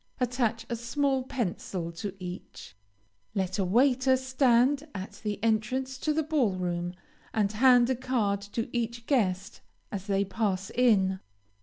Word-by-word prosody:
Attach 240 Hz, -2 st, 0 dB
a 235 Hz, -, -2 dB
small 265 Hz, +3 st, 0 dB
pencil 190 Hz, -8 st, -3 dB
to 185 Hz, +4 st, -6 dB
each. 180 Hz, -, -8 dB, 0.6 s
Let 190 Hz, 0 st, -1 dB
a -, -, +3 dB
waiter 260 Hz, +6 st, +3 dB
stand 260 Hz, +2 st, +2 dB
at 190 Hz, 0 st, -7 dB
the 210 Hz, -1 st, -2 dB
entrance 255 Hz, +4 st, 0 dB
to 305 Hz, -, 0 dB
the 315 Hz, +1 st, +1 dB
ball 285 Hz, -9 st, +1 dB
room, 175 Hz, -1 st, -2 dB, 0.4 s
and 205 Hz, -2 st, +2 dB
hand 245 Hz, +2 st, +5 dB
a -, -, +2 dB
card 230 Hz, -6 st, 0 dB, 0.2 s
to 230 Hz, -, 0 dB
each 235 Hz, 0 st, -2 dB
guest 195 Hz, -9 st, 0 dB, 0.3 s
as 195 Hz, -1 st, -5 dB
they 200 Hz, 0 st, +1 dB
pass 195 Hz, -1 st, -1 dB
in. 195 Hz, -6 st, +3 dB
230 Hz, 145 wpm, -28 LUFS, 195-255 Hz, 0.6 s, hand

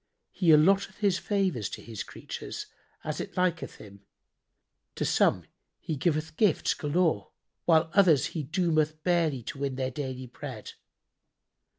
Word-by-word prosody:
He 180 Hz, -, -2 dB
allotteth 190 Hz, +5 st, +5 dB
His 200 Hz, -3 st, +2 dB
favours 185 Hz, -, 0 dB
to -, -, -7 dB
His 115 Hz, -3 st, -6 dB
creatures, -, -, -7 dB, 0.4 s
as -, -, -3 dB
it -, -, -8 dB
liketh 180 Hz, -2 st, 0 dB
Him; 100 Hz, -1 st, -13 dB, 0.9 s
to -, -, -1 dB
some -, -, +3 dB, 0.3 s
he 160 Hz, -, -4 dB
giveth 155 Hz, +1 st, -1 dB
gifts 205 Hz, -8 st, +3 dB
galore 155 Hz, -, 0 dB, 0.4 s
while 160 Hz, -1 st, +4 dB
others 175 Hz, -9 st, +5 dB
He 160 Hz, -, -2 dB
doometh 155 Hz, 0 st, 0 dB
barely 165 Hz, -8 st, +1 dB
to 135 Hz, -, -7 dB
win 140 Hz, -2 st, -2 dB
their 130 Hz, 0 st, -2 dB
daily 130 Hz, -1 st, -5 dB
bread. 125 Hz, -, -8 dB
155 Hz, 135 wpm, -28 LUFS, 135-180 Hz, 0.9 s, allotteth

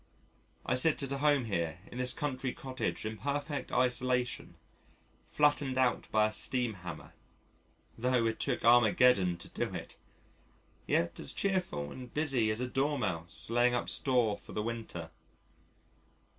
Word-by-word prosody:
I -, -, +1 dB
sit 140 Hz, +4 st, +4 dB
at 135 Hz, -, -4 dB
home 140 Hz, -2 st, +2 dB
here 85 Hz, -6 st, -2 dB
in 120 Hz, -, -7 dB
this 125 Hz, 0 st, +2 dB
country 130 Hz, -3 st, -3 dB
cottage 130 Hz, -4 st, -4 dB
in 110 Hz, 0 st, -4 dB
perfect 145 Hz, +1 st, -3 dB
isolation 125 Hz, 0 st, 0 dB, 0.7 s
flattened 145 Hz, -3 st, +2 dB
out 130 Hz, -1 st, +1 dB
by 110 Hz, -1 st, +4 dB
a 110 Hz, -, 0 dB
steam 120 Hz, +2 st, +1 dB
hammer 90 Hz, -4 st, -9 dB, 0.9 s
(tho' 125 Hz, -1 st, +2 dB
it 110 Hz, 0 st, -1 dB
took -, -, -1 dB
Armageddon 115 Hz, -5 st, +5 dB
to -, -, -11 dB
do -, -, -3 dB
it!), -, -, -8 dB, 0.9 s
yet 85 Hz, 0 st, 0 dB
as -, -, -1 dB
cheerful 180 Hz, -, -1 dB
and 125 Hz, -2 st, -9 dB
busy 135 Hz, -7 st, +1 dB
as 110 Hz, +1 st, -1 dB
a 125 Hz, -, -1 dB
Dormouse 105 Hz, -, -1 dB
laying 120 Hz, +1 st, +3 dB
up 120 Hz, -, -1 dB
store 120 Hz, -6 st, +1 dB
for -, -, -12 dB
the 105 Hz, -, -2 dB
winter. 110 Hz, -8 st, -5 dB
125 Hz, 145 wpm, -32 LUFS, 110-130 Hz, 0.9 s, Armageddon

